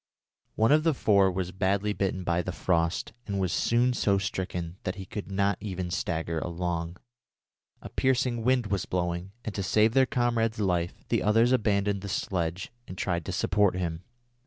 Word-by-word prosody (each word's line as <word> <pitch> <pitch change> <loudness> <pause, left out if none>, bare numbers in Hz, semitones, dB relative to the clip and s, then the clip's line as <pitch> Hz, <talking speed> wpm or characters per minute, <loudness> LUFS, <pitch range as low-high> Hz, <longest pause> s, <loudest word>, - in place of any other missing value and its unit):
One 110 +4 +3
of 155 +1 +6
the 160 -2 +2
four 100 -5 +4
was 90 -1 -3
badly 100 +2 0
bitten 95 -2 -1
by 85 0 +1
the 90 - -4
frost, 85 +2 0
and 100 -1 -2
was 95 -2 0
soon 120 +2 +2
so 100 -4 +2
stricken 90 -2 -3
that 95 0 -3
he 95 -1 -7
could 100 +1 -6
not 100 0 +1
even 95 -4 -4
stagger 80 -1 -2
along. 85 0 -3 0.9
A - - -7
piercing 125 -2 +1
wind 125 -1 +2
was 100 -3 -2
blowing, 90 +1 -2
and 110 - -3
to 100 - -2
save 110 +3 +3
their 135 0 +4
comrade's 120 -3 +1
life, 90 -4 -1
the - - +2
others 115 +3 +4
abandoned 100 -4 +1
the 100 - -6
sledge 90 0 -2 0.2
and 90 - -8
tried 85 -4 -1
to - - -3
support 100 -1 +2
him. 85 -3 -3
95 Hz, 180 wpm, -28 LUFS, 90-110 Hz, 0.9 s, of